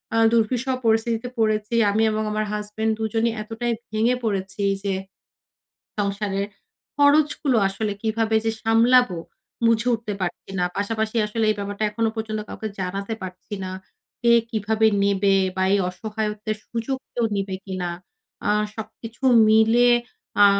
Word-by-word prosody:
আ - - +3
দূর্বিষহ 235 +3 +1
পরিস্থিতিতে 225 +2 +1
পড়েছি। 215 0 +1 0.2
আমি 220 +2 +2
এবং 215 0 -1
আমার 215 0 -1
হাসব্যান্ড 210 +1 -1
২ 220 - -2
জনই 230 +1 +2
এতটাই 230 +2 -2 0.2
ভেঙে 225 +3 +2
পড়েছি 195 -2 -2 0.2
যে, 200 -1 0 1.1
সংসারের 200 -1 -1 0.5
খরচগুলো 285 -2 +3
আসলে 205 +2 -2
কিভাবে 220 0 +1
যে 225 - +2
সামলাবো, 230 -3 +4 0.5
বুঝে 230 +1 +3
উঠতে 220 -2 -4
পারছি 175 +1 -4
না। 180 - +2
পাশাপাশি 220 +2 -1
আসলে 220 +1 -1
এই - - +2
ব্যাপারটা 205 +1 -3
এখনো 225 +1 0
পর্যন্ত 220 -1 -3
কাউকে 220 - -5
জানাতে 195 +4 -3
পারছি 185 +3 -7
না। 185 - -4 0.5
কে 235 0 +5 0.2
কিভাবে 220 0 +1 0.2
নেবে? 200 0 +3 0.2
বা 190 - +1
এই 200 - +4
অসহায়ত্বের 210 +2 -3
সুযোগ 235 +3 -2 0.2
কেউ 240 - 0
নিবে 195 -1 -2
কিনা? 185 -3 -3 0.6
আ - - +3 0.2
সবকিছু 225 +2 -9 0.3
মিলে 225 +3 +5 0.5
আ - - +10
220 Hz, 140 wpm, -23 LUFS, 200-230 Hz, 1.1 s, আ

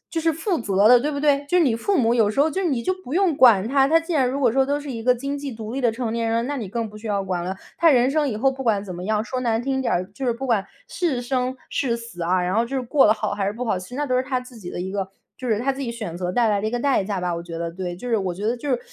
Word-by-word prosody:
就 325 - +1
是 325 0 +2
负 325 +4 -1
责 200 -2 +3
的， 245 - +8
对 295 +5 -1
不 285 - -3
对？ 285 -1 +2
就 360 - +3
是 350 - +5
你 250 -7 +2
父 385 - 0
母 235 -4 +3
有 225 -4 +3
时 245 - -3
候 300 +3 +4
就 380 +5 -2
你 275 -9 0
就 370 - 0
不 255 - -6
用 365 -3 +2
管 225 -7 +6
他， 270 +2 +4
他 325 +2 +5
既 330 +1 -5
然 275 -5 +3
如 270 +2 -2
果 255 -4 +4
说 265 +3 +3
都 285 +2 0
是 290 -1 -8
一 230 -2 -5
个 250 +1 +5
经 275 +4 -4
济 280 -1 -5
独 220 -1 -7
立 270 - -2
的 240 -2 +3
成 225 -1 -3
年 230 0 -1
人 230 - +1
了， 230 - 0
那 285 +4 -3
你 215 -7 -5
更 230 +2 -3
不 210 - -11
需 215 - -12
要 200 -2 0
管 180 -2 -2
了。 190 +2 -4 0.2
他 335 - +5
人 250 -1 +4
生 295 0 +1
以 215 - -3
后 270 +4 +3
不 265 0 -6
管 220 -5 +2
怎 185 -3 -6
么 175 - -6
样， 215 +2 0
说 255 +1 -3
难 230 -2 0
听 265 +1 -1
点 260 - -1
儿， 180 +1 0
就 265 - -5
是 245 - +2
不 265 +3 -5
管 215 -6 +1 0.2
是 305 -9 -1
生、 255 +1 -1
是 235 -4 0
死 230 -7 -9
啊， 180 +2 +2
然 180 +2 -1
后 225 - +3
就 270 +3 -3
是 - - 0
过 265 +3 +3
得 215 - +5
好， 210 -1 -3
还 200 -1 -2
是 200 - 0
不 245 +3 -4
好， 215 - 0
其 185 0 -9
实 250 - -8
那 295 +2 -1
都 255 -3 0
是 255 - +2
他 260 -1 -1
自 250 -1 -13
己 185 -5 -8
的 - - -5
一 185 +1 -3
个 195 -1 -3 0.3
就 255 - -6
是 215 -2 +2
他 270 +3 0
自 270 - -7
己 245 -4 -3
选 215 -8 -6
择 180 0 -2
带 235 +4 +2
来 205 -1 +1
的 215 - -1
一 - - -3
个 245 - -1
代 270 -5 +2
价 195 -1 -3
吧， 180 -1 -1
我 170 - -5
觉 170 -1 -7
得， 170 0 -3
对。 175 0 -5
就 245 - -7
是 235 - +2
我 190 -3 -2
觉 200 +4 -3
得 235 - +1
就 265 +4 -6
是， 250 -2 +1
240 Hz, 385 characters per minute, -23 LUFS, 210-270 Hz, 0.3 s, 的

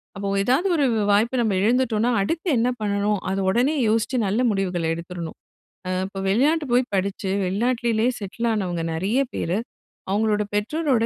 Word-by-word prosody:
அப்ப 200 0 -3
ஏதாவது 265 - +2
ஒரு 290 - +3 0.3
வாய்ப்ப 230 +5 +2
நம்ம 215 -4 +1
இழந்துட்டோம்னா, 235 0 +2
அடுத்து 330 - -2
என்ன 235 +2 +2
பண்ணணும்? 205 0 0
அத 195 - -1
உடனே 255 +9 +2
யோசிச்சு 225 +4 +1
நல்ல 205 +4 0
முடிவுகள் 180 -5 -1
எடுத்துறணும். 170 0 -7 0.5
ம் 185 0 0
இப்ப 195 - -11
வெளிநாட்டுக்கு 280 +5 +2
போய் 250 +1 +1
படிச்சு 195 0 -2 0.2
வெளிநாட்டிலேயே 235 +4 +1
செட்டில் 210 +3 -3
ஆனவங்க 180 -5 -2
நிறைய 195 +10 0
பேர், 175 +4 -1 0.5
அவங்களோட 210 0 +1
பெற்றோரோட 240 +3 +1
210 Hz, 145 wpm, -23 LUFS, 195-245 Hz, 0.5 s, ஒரு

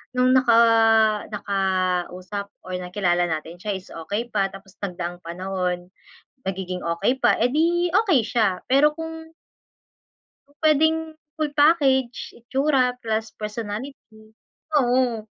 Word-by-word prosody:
nung 250 0 +3
naka 245 -3 +4 0.8
nakausap 190 0 -2
or 185 0 -5
nakilala 180 -1 0
natin 160 +1 -4
siya 205 +1 -3
is 185 - -19
okey 205 +8 -4
pa, 195 -1 +1
tapos 195 0 -13
nagdaang 175 -2 -4
panahon, 180 0 -3 0.6
nagiging 185 -1 -4
okey 195 +10 0
pa, - - +5
edi, 335 +8 +2
okey 390 - +4
siya. 215 -7 +1
Pero 285 +3 +5
kung 320 0 -7 1.2
Pu-pwedeng 310 +2 +2 0.4
full 310 -2 -1
package, 270 -6 +3 0.2
itsura 270 +2 +1 0.2
plus 220 0 -1 0.2
personality, 220 +1 -6 0.6
oo, 245 -3 +1
215 Hz, 110 wpm, -23 LUFS, 185-270 Hz, 1.2 s, pa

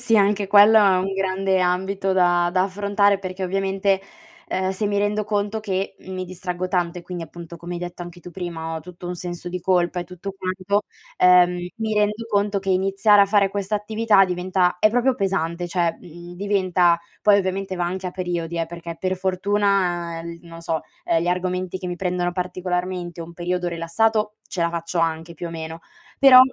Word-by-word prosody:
sì, 225 -2 +3
anche 200 0 +3
quello 210 +2 +7
è 195 -3 +5
un 195 +1 -1
grande 190 0 0
ambito 190 +2 0
da 175 -1 +3
da 185 +1 +2
affrontare 200 +1 +2
perché 185 0 -5
ovviamente, 195 +1 0 0.5
ehm, 185 0 0
se 200 +2 -2
mi 205 0 0
rendo 205 +1 0
conto 210 +1 -1
che 195 -2 -3
mi 185 0 -5
distraggo 180 0 -4
tanto 180 -1 -1
e - - -10
quindi 175 -1 -6
appunto 170 +1 -10
come 175 +1 -6
hai - - -3
detto 175 0 -7
anche 175 0 -8
tu 180 - -10
prima 165 -3 -5
ho - - -5
tutto 175 +2 -10
un 180 - -3
senso 175 0 -6
di 180 0 -4
colpa 180 0 +1
e 175 - -5
tutto 180 +2 -7
quanto, 190 +2 -1 0.3
ehm, 180 -1 +5
mi 220 -1 -2
rendo 210 +2 +1
conto 205 -1 +1
che 195 0 -3
iniziare 195 +2 +4
a 200 - +6
fare 200 -1 +3
questa 200 +1 -2
attività 210 -1 +3
diventa 180 0 0
è 215 - +5
proprio 245 +3 +2
pesante. 175 -5 -1
Cioè, 170 -2 0
uhm, 175 +1 -11
diventa 185 -3 +2 0.2
poi 205 -1 +5
ovviamente 190 -1 -2
va 175 - 0
anche 185 +1 -3
a 180 - -4
periodi 170 -2 -3
eh, 165 - +1
perché 170 0 -8
per 185 0 -1
fortuna, 185 -3 0
ehm, 170 0 -7
non 170 -1 -13
lo - - -10
so, 165 -2 -1 0.2
ehm, 165 - +2
gli 175 - -1
argomenti 180 0 -1
che 185 - -6
mi 175 -1 -3
prendono 180 -1 -1
particolarmente 180 -1 -3
un 170 +1 -8
periodo 180 +1 -2
rilassato 210 +6 0
ce 175 - -2
la 170 - +1
faccio 170 +1 -2
anche 165 0 -1
più 170 +2 -6
o - - -7
meno, 160 0 -6 0.4
però 270 -2 +9
185 Hz, 200 wpm, -22 LUFS, 175-200 Hz, 0.5 s, però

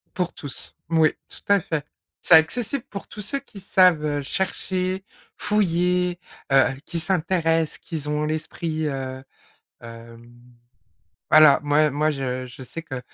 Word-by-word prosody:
Pour 180 -1 -1
tous, 145 -3 -8
moui, 160 -1 +3 0.2
tout - - -10
à 200 -1 +5
fait. 160 -3 -3 0.4
C'est - - +5
accessible 230 - +3
pour 200 - -7
tous 210 - -9
ceux 275 +8 -3
qui 210 -8 -13
savent, 180 -5 +4
heu, 145 -1 -1
chercher, 185 +3 -2 0.3
fouiller, 180 -3 +1 0.3
heu, 135 -1 +7 0.2
qui 170 - -2
s'intéressent, 165 -2 0
qui 165 - -6
z 150 - -9
ont 150 0 0
l'esprit, 155 0 -3
heu, 130 -2 -5 0.6
hem, 115 0 -12 1.0
voilà, 155 -2 +7
moi 150 +1 +3
moi, 150 +3 +1
je 130 -3 -3
je 130 +2 -11
sais 165 +6 -8
que 135 -5 -6
160 Hz, 145 wpm, -23 LUFS, 145-180 Hz, 1.0 s, heu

